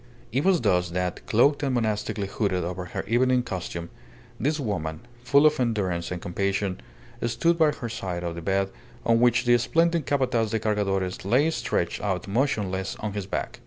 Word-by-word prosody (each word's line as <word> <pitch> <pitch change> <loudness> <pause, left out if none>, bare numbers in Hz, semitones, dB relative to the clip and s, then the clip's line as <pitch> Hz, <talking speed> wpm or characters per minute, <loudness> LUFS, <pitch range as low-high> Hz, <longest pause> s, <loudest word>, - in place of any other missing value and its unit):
It 135 +5 +1
was 190 -3 +3
thus 90 -5 +2
that, 90 +1 -2
cloaked 140 +7 +4
and 135 -3 0
monastically 110 -3 -1
hooded 95 -2 -1
over 90 +1 -4
her - - -4
evening 125 +2 +3
costume, 90 -6 -5 0.5
this 150 +3 0
woman, 80 - -3 0.2
full 140 +4 +5
of 150 -1 +4
endurance 95 -8 0
and 90 - -4
compassion, 95 +2 -2 0.5
stood 165 +9 +1
by 160 -1 +6
the 125 -5 -4
side 95 -6 -4
of 85 -1 -2
the 85 - -6
bed 95 +2 0 0.3
on 115 0 +4
which 120 0 +3
the 120 0 +5
splendid 165 +4 +1
Capataz 125 -5 +1
de 110 - 0
Cargadores 100 -4 -1
lay 130 +11 +3
stretched - - -1
out 95 -2 -2
motionless 100 -5 -1
on 105 -2 -4
his 100 -2 -4
back. - - -4
105 Hz, 175 wpm, -26 LUFS, 95-125 Hz, 0.5 s, by